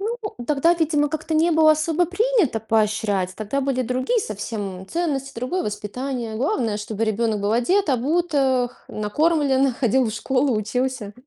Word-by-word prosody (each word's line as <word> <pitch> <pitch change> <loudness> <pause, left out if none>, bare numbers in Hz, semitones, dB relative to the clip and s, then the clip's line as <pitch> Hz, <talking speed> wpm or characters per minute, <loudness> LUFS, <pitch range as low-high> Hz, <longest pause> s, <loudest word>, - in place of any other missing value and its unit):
Ну, 450 +4 -2 0.3
тогда, 305 +4 +3
видимо, 300 -3 +1
как-то 315 +1 -3
не 325 +2 +3
было 315 -1 +6
особо 320 +2 +1
принято 380 - +1
поощрять, 210 -4 0
тогда 215 +7 -2
были 265 -1 0
другие 255 - 0
совсем 200 - -5
ценности, 280 -6 -2
другое 255 +10 -2
воспитание. 225 +2 -4
Главное, 240 - 0
чтобы 215 +1 -3
ребенок 220 -1 0
был 205 +1 0
одет, 340 - +2
обут, 305 +7 +1
эх, 260 -3 0
накормлен, 275 +3 +1
ходил 255 0 +2
в 220 - -1
школу, 255 +2 0
учился. 235 0 -2
260 Hz, 150 wpm, -22 LUFS, 220-310 Hz, 0.3 s, было